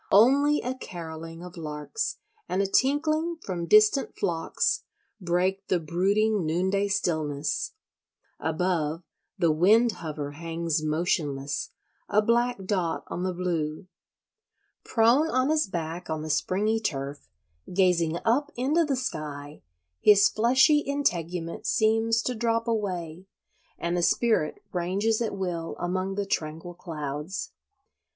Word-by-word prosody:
Only 280 +8 +5
a 250 - -1
carolling 165 -7 -8
of 180 0 -10
larks 155 - -4 0.3
and 185 - 0
a 200 - +3
tinkling 310 - +1
from 175 -3 -4
distant 215 - +4
flocks 165 -1 0 0.4
break 185 +2 0
the 180 - +2
brooding 195 +6 +1
noonday 190 +5 +1
stillness; 155 -6 -1 0.7
above, 160 -1 -1 0.3
the 170 -3 +3
wind 215 +9 +4
hover 150 -6 -5
hangs 165 0 -2
motionless, 150 -3 -1 0.4
a 205 - +4
black 235 -1 +1
dot 185 -4 -1
on 175 - -4
the 185 0 0
blue. 170 -2 -2 1.0
Prone 245 +8 +3
on 255 +2 +2
his 310 -5 +2
back 170 -1 -5
on 155 -1 -2
the 155 - -2
springy 210 +8 +1
turf, 140 -8 -4 0.4
gazing 175 -3 +2
up 245 +6 +2
into 285 +7 +2
the 290 -3 0
sky, 150 - -5 0.4
his 205 -1 +6
fleshy 260 +7 +4
integument 180 - -2
seems 225 0 +2
to 250 - -1
drop 230 0 0
away, 185 -6 -3 0.5
and 170 +1 -2
the 175 - +1
spirit 215 -4 +1
ranges 195 +6 0
at 220 -3 -2
will 175 -3 -3
among 185 +2 -2
the 200 0 -1
tranquil 160 -1 -3
clouds. 155 0 -5
185 Hz, 125 wpm, -27 LUFS, 165-225 Hz, 1.0 s, his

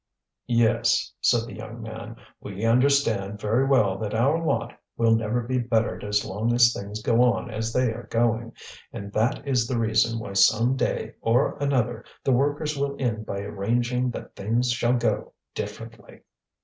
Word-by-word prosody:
"Yes," 115 -2 +2
said 120 -2 +3
the 115 - -9
young 110 +2 -8
man, 110 0 -8 0.2
"we 100 +2 -5
understand 115 -5 +2
very 115 +6 +1
well 105 -8 +3
that 105 0 -3
our 140 +9 +2
lot 160 - -1 0.2
will 115 -1 +4
never 115 +2 -1
be 125 +2 -1
bettered 115 -2 0
as 105 0 0
long 105 +5 -1
as 120 -1 +6
things 105 +2 -6
go 115 +1 +3
on 125 0 +1
as 110 +1 -3
they 125 -1 +1
are 120 +2 -9
going; 115 0 0 0.4
and 100 0 -8
that 120 +6 0
is 125 -4 +1
the 125 - -1
reason 115 0 +2
why 100 -3 -6
some 115 +6 +4
day - - -2
or 120 +5 +2
another 130 -4 0 0.2
the 135 - +1
workers 145 +4 +1
will 140 0 -2
end 110 -5 -2
by 100 - -3
arranging 120 +5 -1
that 120 - -8
things 115 +5 0
shall 120 0 +1
go 120 - -1 0.2
differently." - - -8
115 Hz, 170 wpm, -25 LUFS, 110-125 Hz, 0.4 s, as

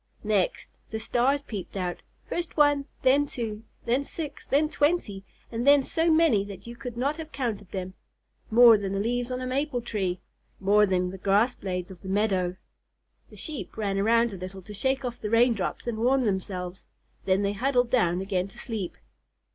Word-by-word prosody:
Next, 210 -4 0 0.2
the 220 - -3
stars 255 +5 +1
peeped 205 -6 -6
out, 180 -2 -3 0.2
first 340 -1 -4
one, 290 -1 +4 0.2
then 280 +3 +4
two, 225 -4 -5 0.2
then 250 +4 +2
six, 295 0 -7
then 295 +3 +3
twenty, 290 - 0 0.3
and 235 +3 -2
then 285 -1 +7
so 325 +5 +1
many 315 -11 +4
that 200 -2 -9
you 235 0 -8
could 245 -2 -7
not 280 +5 0
have 320 -1 -7
counted 215 -8 -3
them, 185 -1 -5 0.6
more 230 -1 +8
than 195 -1 -3
the 195 - -1
leaves 240 +3 -1
on 255 0 -3
a - - -3
maple 265 +1 -1
tree, 195 -6 -2 0.4
more 205 +2 +4
than 180 -1 0
the 190 - -9
grass 205 +6 +3
blades 180 -1 -4
of 180 - -12
the 190 - -7
meadow. 190 -3 +1 0.7
The - - -14
Sheep 305 -8 -6
ran 200 -2 -1
around 230 +2 +3
a - - -6
little 185 +1 -8
to 210 - -10
shake 265 +5 0
off 245 -1 -4
the 210 - -3
rain 235 +2 +5
drops 200 -5 -3
and 235 -2 -3
warm 255 +2 +3
themselves, 190 -2 -3 0.4
then 190 +1 +2
they 200 0 +1
huddled 245 +2 +1
down 180 -8 +2
again 190 -1 -1
to 195 - -17
sleep. 215 -7 -5
225 Hz, 190 wpm, -27 LUFS, 195-260 Hz, 0.7 s, more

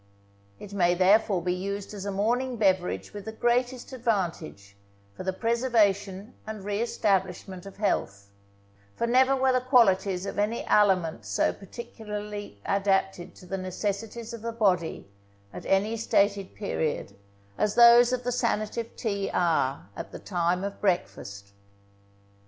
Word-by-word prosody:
It 200 - -10
may 175 -3 +3
therefore 190 0 +3
be 180 0 0
used 200 +3 -4
as 200 -1 -6
a 200 - -2
morning 240 +6 0
beverage 190 -4 0
with 205 -1 -8
the 220 - -4
greatest 245 +3 0
advantage, 170 - -3 0.4
for - - -8
the 190 - -1
preservation 210 -2 0
and 215 -3 -6
re 205 +1 -1
establishment 190 -4 -1
of 195 - -11
health; 100 - -2 0.6
for - - -1
never 260 +3 +4
were 265 0 +2
the 255 - +2
qualities 195 -7 +3
of 200 - -4
any 215 +3 -1
aliment 185 - +2
so 100 0 +1
particularly 210 - -7
adapted 195 -2 0
to - - -14
the 195 +1 -4
necessities 210 +5 -4
of 230 - -7
the 230 +1 -3
body 185 - 0 0.5
at - - -8
any 205 +4 +2
stated 200 -3 +1
period 160 - -3 0.4
as 210 -1 +1
those 240 0 +8
of 255 -1 -1
the 245 - -1
sanative 230 -2 -2
tea 200 -4 -2
are 145 - +1
at - - -7
the - - -7
time 175 0 -1
of 200 0 -5
breakfast. 100 - -2
200 Hz, 145 wpm, -27 LUFS, 185-230 Hz, 0.6 s, those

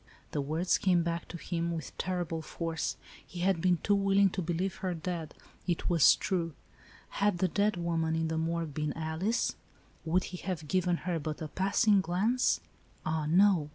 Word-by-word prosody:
The 145 - -1
words 160 +6 +1
came 180 -3 +3
back 170 0 -2
to 170 - -7
him, 170 0 -2
with 160 -4 -6
terrible 175 -3 -2
force. 165 0 -3 0.3
He 175 - -8
had 185 -2 +2
been 180 0 +3
too 205 - +3
willing 195 -1 +4
to 190 - -2
believe 175 +3 -2
her 185 -2 -2
dead. 165 -1 -4 0.3
It 175 0 0
was 165 -5 +7
true. 165 -5 -2 0.5
Had 205 -2 +1
the 185 - +2
dead 205 +3 +1
woman, 165 -2 0
in 160 0 0
the 160 0 -2
morgue, 165 -1 -2
been 150 +1 -2
Alice, 160 +8 -1 0.5
would 175 +3 +1
he 180 - -6
have 170 -4 -4
given 180 0 +1
her 175 -3 0
but' 155 0 -4
a 155 - -5
pass 195 +6 +1
ing 205 -2 +6
glance? 200 +9 +1 0.4
Ah, 155 -1 -1
no. 175 -2 +4
170 Hz, 185 wpm, -31 LUFS, 160-185 Hz, 0.5 s, was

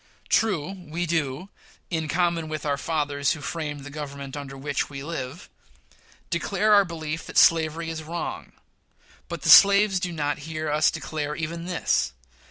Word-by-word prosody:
True, 190 -7 +1 0.2
we 170 +3 -2
do, 160 +1 -2 0.4
in 160 -2 -1
common 170 0 0
with 155 -1 -4
"our 145 -1 +1
fathers, 145 -1 0
who 160 - -7
framed 150 -1 -4
the 145 - -9
Government 140 -2 -7
under 140 -2 -7
which 140 +1 -2
we 135 -1 -7
live," 145 -1 -6 0.8
declare 200 +4 +2
our 200 -1 +7
belief 165 -2 -5
that - - -5
slavery 165 0 +4
is 160 -1 -5
wrong; 165 +2 -5 0.8
but - - -6
the - - 0
slaves 200 -1 +8
do 180 0 -3
not 145 -3 -2
hear 155 -1 -3
us 155 +1 +4
declare 150 -2 -4
even 165 +1 -4
this. 180 - 0
155 Hz, 160 wpm, -25 LUFS, 145-170 Hz, 0.8 s, slaves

